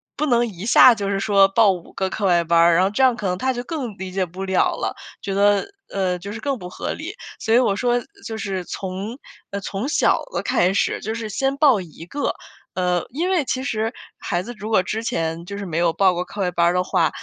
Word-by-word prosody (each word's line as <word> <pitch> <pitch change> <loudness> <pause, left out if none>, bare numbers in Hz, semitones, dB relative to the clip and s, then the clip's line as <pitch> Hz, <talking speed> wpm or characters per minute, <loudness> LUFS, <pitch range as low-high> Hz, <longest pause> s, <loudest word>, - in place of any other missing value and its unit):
不 305 - 0
能 240 -4 +2
一 195 -3 -8
下 240 +1 +7
就 200 -2 -3
是 195 -1 0
说 195 -1 +4
报 215 +1 +4
五 180 -3 -7
个 190 -1 -1
课 200 +2 -3
外 175 -2 +4
班 170 +1 +3
儿， 170 0 +6
然 180 - +4
后 190 - +2
这 210 +6 +1
样 260 -1 +6
可 210 - -3
能 180 0 -1
他 260 +7 0
就 245 -1 -3
更 250 - -5
理 190 0 -5
解 190 0 0
不 185 +3 -7
了 190 -1 +2
了， - - -3 0.3
觉 195 - -3
得， 205 0 +3 0.3
呃， 185 -2 0
就 200 +3 -8
是 220 - -6
更 275 +2 -2
不 180 -4 -8
合 - - -4
理。 - - -6 0.3
所 225 - +1
以 240 - +7
我 220 -6 +2
说 245 +3 +1 0.2
就 225 -1 -5
是 195 -4 -3
从 195 +7 -5 0.3
呃， 200 - -3
从 200 +4 -4
小 - - +2
的 - - -1
开 180 +2 +2
始， 200 - 0
就 220 - -3
是 225 -1 -4
先 270 +6 -1
报 275 -9 +5
1 165 -1 -11
个。 285 +11 -2 0.4
呃， 180 -1 +1
因 330 +8 -1
为 355 -7 +1
其 260 0 -2
实 225 -3 -1 0.3
孩 175 +1 -2
子 240 - -7
如 215 +1 -6
果 215 -4 +3
之 215 +4 -3
前 165 -8 -2
就 200 +3 -6
是 200 - -5
没 165 -3 -4
有 170 -1 +2
报 190 0 +3
过 180 +1 -3
课 200 - -6
外 180 -2 0
班 170 0 +2
儿 170 - +3
的 180 0 +1
话， 180 -3 +2
200 Hz, 270 characters per minute, -22 LUFS, 180-230 Hz, 0.4 s, 下